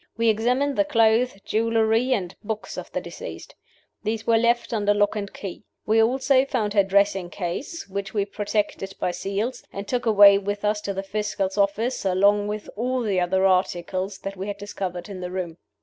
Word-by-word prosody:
We 230 0 +3
examined 250 +6 +1
the 300 - +5
clothes, 230 -3 +3
jewelry, 225 +2 +2
and 195 -8 0
books 215 0 -4
of - - -7
the - - -1
deceased. - - -9 0.5
These 220 +1 -3
we 230 - +4
left 235 +1 +1
under 205 -2 +2
lock 205 +1 +2
and 200 -2 -4
key. 195 +1 -8 0.2
We 220 +1 +4
also 260 +3 +3
found 230 -7 -1
her 200 -2 +5
dressing 195 -2 +2
case, 195 - -5
which 200 +1 -4
we 205 -2 0
protected 205 -1 -2
by 180 - 0
seals, 200 +7 -3
and 200 0 -6
took 245 +1 -1
away 200 -2 +8
with 205 +1 -3
us 210 0 +1
to 200 -1 -4
the 195 - -3
Fiscal's 195 -1 -2
office, 210 +5 0
along 200 +2 +3
with 210 0 -4
all 250 +3 -1
the 200 -4 +1
other 190 +2 +2
articles 185 +1 0
that 195 0 -5
we 195 +1 -5
had 205 -1 -4
discovered 185 -3 -5
in 195 -3 -7
the 180 - -4
room. 180 -2 -5
205 Hz, 190 wpm, -24 LUFS, 195-225 Hz, 0.5 s, away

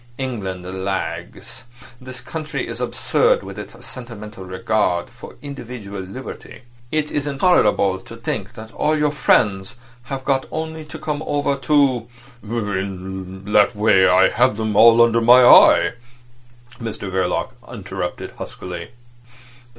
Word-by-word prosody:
England 100 -9 -4 0.2
lags. 95 -1 -5 0.4
This 130 -1 -9
country 155 +4 -5
is - - -6
absurd 485 +1 +1
with - - -8
its - - -10
sentimental 105 -5 -9
regard 95 0 -1
for 120 0 -12
individual 120 -8 -7
liberty. 125 +7 -9 0.3
It's 155 -1 -1 0.2
intolerable 120 - +2
to - - -12
think - - -5
that 110 0 -10
all 155 +1 +1
your 150 -1 +1
friends 100 -8 +1 0.3
have 135 0 -6
got 135 -2 0
only 160 0 -5
to 150 - -9
come 150 -1 -4
over 145 -2 0
to—" 135 -3 +2 0.3
"In 95 -3 -5
that 105 0 +4
way 105 -3 +4
I 90 +1 +5
have 125 -3 +2
them 110 -2 -2
all 115 +2 +7
under 115 0 +2
my 125 +2 +7
eye," - - +7 0.9
Mr 110 -4 -5
Verloc 95 -1 -1 0.2
interrupted - - -5
huskily. 90 -2 -7
115 Hz, 125 wpm, -20 LUFS, 95-135 Hz, 0.9 s, all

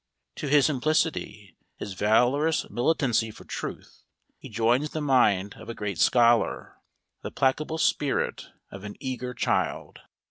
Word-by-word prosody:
To 150 - -4
his 145 0 +4
simplicity, 150 - -1 0.2
his 100 - -6
valorous 125 - +2
militancy 120 -4 +1
for 110 - -12
truth, - - -7 0.4
he - - -11
joins 120 +6 +1
the 155 - -4
mind 115 -9 +2
of - - -11
a 115 - -5
great 100 -4 -4
scholar, 120 -1 +2 0.4
the - - -5
placable 150 +4 0
spirit 145 -3 0 0.2
of 100 0 -10
an 105 0 -7
eager 125 -2 -5
child. - - -2
125 Hz, 135 wpm, -26 LUFS, 110-145 Hz, 0.4 s, his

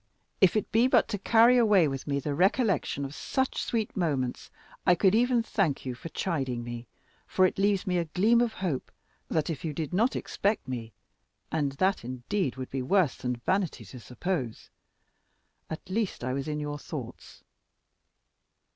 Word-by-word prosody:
If 190 0 +5
it 215 - -1
be 230 +3 +4
but - - +4
to 205 -3 -2
carry 230 +4 +5
away 205 -8 +5
with 135 0 -5
me 140 -1 0
the 145 +1 -3
recollection 190 - +1
of 135 - -7
such 265 +10 -1
sweet 225 -3 -2
moments, 140 -9 -1 0.3
I 180 - +5
could 190 +1 +3
even 240 +1 +3
thank 190 -13 0
you 130 - -2
for 125 +7 -8
chiding 135 -8 -2
me, 120 0 -7 0.4
for 185 - +3
it 185 - 0
leaves 200 -1 +2
me 180 -1 +1
a 170 - -1
gleam 215 +9 +3
of 240 -2 +1
hope, 170 -9 -3 0.4
that 160 +1 0
if 150 - -6
you 160 -3 -2
did 155 +1 -4
not 225 +8 +2
expect 205 -7 -1
me 120 -3 -5 0.6
(and 145 -3 0
that 185 +4 +1
indeed 130 +6 -2
would 130 -1 -7
be 135 - -2
worse 175 0 +2
than 125 0 -2
vanity 185 - 0
to 125 +6 -10
suppose), 125 - -4 1.0
at 160 - -7
least 200 - -2
I 130 +1 -1
was 135 +1 -3
in 150 -1 -2
your 145 0 -4
thoughts. - - -8
165 Hz, 175 wpm, -28 LUFS, 135-200 Hz, 1.0 s, If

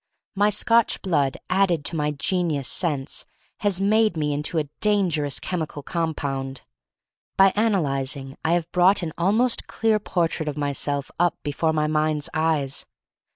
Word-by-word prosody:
My 205 +1 +3
Scotch 230 +2 +2
blood 145 -7 +1
added 180 -6 +1
to 155 - 0
my 150 -1 0
genius 150 -1 -1
sense 145 -6 0 0.3
has 200 -4 0
made 215 -1 +2
me 150 -1 0
into 150 +3 -2
a 150 -2 0
dangerous 175 -9 +1
chemical 160 -5 -4
compound. 140 -6 -3 0.7
By 195 0 +6
analyzing 140 -10 0
I 160 - +2
have 175 -1 -1
brought 185 +2 +4
an 160 -2 -4
almost 220 +8 +1
clear 220 -2 +1
portrait 165 -5 -1
of 150 - -6
myself 145 -1 -1
up 175 -2 +2
before 155 +2 0
my 155 -1 0
mind's 155 -1 +1
eyes. 155 -4 0
160 Hz, 145 wpm, -23 LUFS, 145-190 Hz, 0.7 s, By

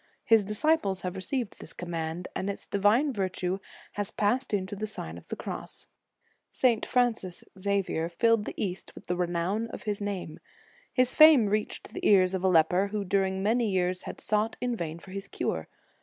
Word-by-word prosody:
His 225 -2 +5
disciples 210 - +1
have 180 0 -3
received 230 +4 -3
this - - -6
command, 170 0 -4
and 190 - -2
its 200 - -6
divine 220 +8 +3
virtue 185 -2 -2 0.3
has 205 -1 -2
passed 245 +6 0
into 200 0 -1
the 215 +2 -3
Sign 80 - -5
of 85 - -12
the - - -4
Cross. - - -6 0.6
St. 240 -4 +2
Francis 230 -8 0 0.2
Xavier 190 -4 0
filled 230 +4 +2
the - - -6
East 185 -2 -4
with - - -12
the 180 - -1
renown 180 +5 -1
of - - -8
his 210 -2 -2
name. 195 -6 -4 0.5
His 255 0 +2
fame 310 -7 +8
reached 210 +1 -2
the - - -6
ears 185 -2 +5
of 190 -1 -2
a - - +4
leper 180 +2 +4
who 205 0 -3
during 190 0 +1
many 225 +2 +2
years 185 -1 0
had - - -7
sought 215 +1 0
in 245 -1 -1
vain 165 -5 -4
for 185 +2 -13
his 195 +1 -6
cure. - - -3
200 Hz, 185 wpm, -28 LUFS, 180-220 Hz, 0.6 s, fame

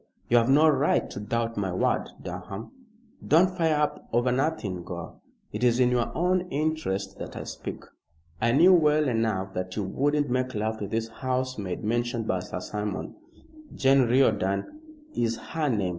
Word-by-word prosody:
"You 120 - +5
have 115 +1 +3
no 150 +4 +6
right 145 -1 +2
to - - -6
doubt 115 +2 -2
my 95 -2 -1
word, 90 - 0
Durham." 95 +4 -7 0.5
"Don't 180 +4 +4
fire 165 -3 +2
up 150 0 -1
over 120 +2 +2
nothing, 125 - -1
Gore. 85 -1 -8 0.3
It 105 +3 -4
is 120 0 +3
in 125 -1 +4
your 120 -1 +1
own 180 +1 +1
interest 140 -11 -2
that - - -7
I - - -5
speak. - - -7 0.6
I 115 - +3
knew 175 +9 +6
well 150 -3 +4
enough 110 -6 -1
that 90 0 -4
you 105 - -1
wouldn't 145 +9 0
make 130 0 -1
love 110 +1 -2
to 100 - -3
this 115 +2 -2
housemaid 125 -6 -3
mentioned 120 +1 -1
by 95 - +1
Sir 90 0 -6
Simon 105 0 -4 0.6
Jane 135 0 +4
Riordan 110 - +1 0.3
is 115 -1 0
her 155 -3 -2
name. 105 -7 0
120 Hz, 170 wpm, -27 LUFS, 105-145 Hz, 0.6 s, no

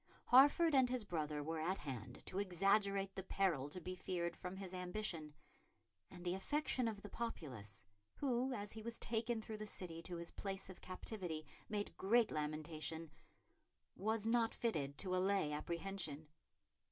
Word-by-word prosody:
Hertford 290 +6 +8
and 260 -2 +6
his 250 -2 0
brother 155 -6 -1
were 160 +2 -2
at 180 +5 +1
hand 125 -4 -6
to 190 - -2
exaggerate 195 +1 +3
the 190 - -3
peril 175 -7 +1
to 180 - -5
be 185 +2 -4
feared 175 -2 -1
from 180 +1 -5
his 190 -1 -6
ambition; 180 -4 -3 0.7
and 180 -1 -10
the 175 - +2
affection 255 +4 +1
of 210 -3 -3
the - - -5
populace, 135 - -5 0.3
who, 260 -1 +1
as 210 -4 -3
he 220 - -6
was 230 +1 -3
taken 225 0 0
through 215 0 -5
the 215 0 -4
city 170 -5 -5
to 175 +1 -5
his 170 0 -6
place 195 -1 -4
of 185 - -13
captivity, 180 -4 -4 0.2
made 205 -1 -2
great 230 +3 +4
lamentation, 155 +1 -2 0.8
was 220 +1 +1
not 230 0 +3
fitted 145 -12 0
to 185 +1 0
allay 185 -4 +3
apprehension. 160 0 -2
190 Hz, 160 wpm, -40 LUFS, 160-215 Hz, 0.8 s, Hertford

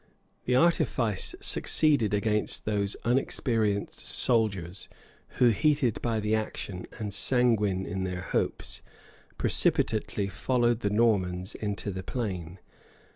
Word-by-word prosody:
The 125 - +2
artifice 125 - +1
succeeded 145 -9 +3
against 105 +1 -1
those 100 -2 0
unexperienced 115 -4 0
soldiers, 100 -6 0 0.5
who, 125 - +5
heated 135 -1 +1
by 115 -2 0
the 105 0 -1
action, 105 -4 -3
and 105 -3 -4
sanguine 105 -4 +2
in 95 0 -3
their 90 -1 -3
hopes, 95 - -2 0.6
precipitately 100 - +1
followed 120 +3 0
the 105 - -1
Normans 100 -4 +1
into 105 -1 -4
the 95 0 -5
plain. 95 -6 -4
105 Hz, 110 wpm, -28 LUFS, 95-120 Hz, 0.6 s, who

